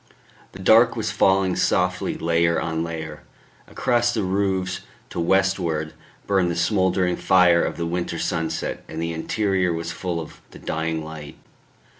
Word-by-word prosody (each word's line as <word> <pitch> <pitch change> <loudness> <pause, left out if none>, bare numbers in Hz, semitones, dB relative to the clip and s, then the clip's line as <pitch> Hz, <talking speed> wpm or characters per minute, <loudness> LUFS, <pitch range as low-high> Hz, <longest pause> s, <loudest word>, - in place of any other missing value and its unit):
The - - -9
dark - - +6
was - - -2
falling 95 -1 +2
softly 90 0 0
layer 85 0 +2
on 80 0 -2
layer; 80 -2 -6 0.5
across 120 -1 +1
the 110 - 0
roofs 95 -1 -1 0.3
to - - -4
westward 85 -3 +1 0.3
burned 95 -3 +2
the 85 - -2
smouldering 90 -1 +1
fire 90 -2 +4
of - - -3
the 85 - -2
winter 85 +1 -2
sunset, 80 0 -2
and 80 - -7
the 85 0 -2
interior 95 +1 0
was 85 0 -3
full 85 0 -3
of 80 - -9
the - - -13
dying 80 0 -3
light. 75 -2 -9
85 Hz, 150 wpm, -23 LUFS, 80-95 Hz, 0.5 s, dark